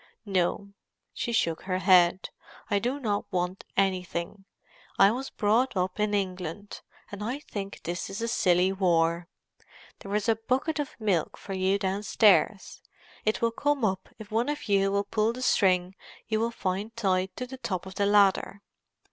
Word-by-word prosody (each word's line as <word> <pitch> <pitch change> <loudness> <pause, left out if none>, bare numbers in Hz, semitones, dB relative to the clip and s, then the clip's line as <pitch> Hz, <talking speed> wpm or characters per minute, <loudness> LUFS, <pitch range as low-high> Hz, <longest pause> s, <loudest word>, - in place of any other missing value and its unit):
"No." 200 +1 -1 0.4
She 240 - -3
shook 170 -8 0
her 185 -1 -2
head. 185 -1 +4 0.4
"I 200 - +3
do 250 +6 -2
not 210 -6 -2
want 180 0 -2
anything. 185 0 -1 0.5
I 195 +1 +6
was 260 +4 -4
brought 220 +2 +1
up 185 +2 -1
in 210 0 +1
England, 185 0 -4 0.3
and 205 0 -6
I 245 +5 -2
think 200 -9 -7
this 175 +2 -4
is 195 - -6
a 230 - -2
silly 185 -4 +3
war. 170 -2 +1 0.7
There 200 +1 -5
is 210 +1 0
a 225 -1 +3
bucket 260 +7 -1
of 290 - -4
milk 195 -8 0
for 195 - -7
you 190 +1 +1
downstairs; 200 +1 +2 0.4
it 215 +2 0
will 230 - +3
come 285 0 0
up 190 -2 -2
if 215 -1 -11
one 230 +5 +1
of 295 -3 -4
you 195 -1 +2
will 200 0 +1
pull 215 +2 0
the 255 +1 -6
string 185 -5 +2 0.3
you 220 0 0
will 230 +1 +1
find 205 0 -3
tied 190 -4 0
to 250 - -4
the 260 +1 -9
top 195 -9 -4
of 190 - -8
the 200 +1 0
ladder." 200 0 +3
200 Hz, 175 wpm, -27 LUFS, 185-225 Hz, 0.7 s, I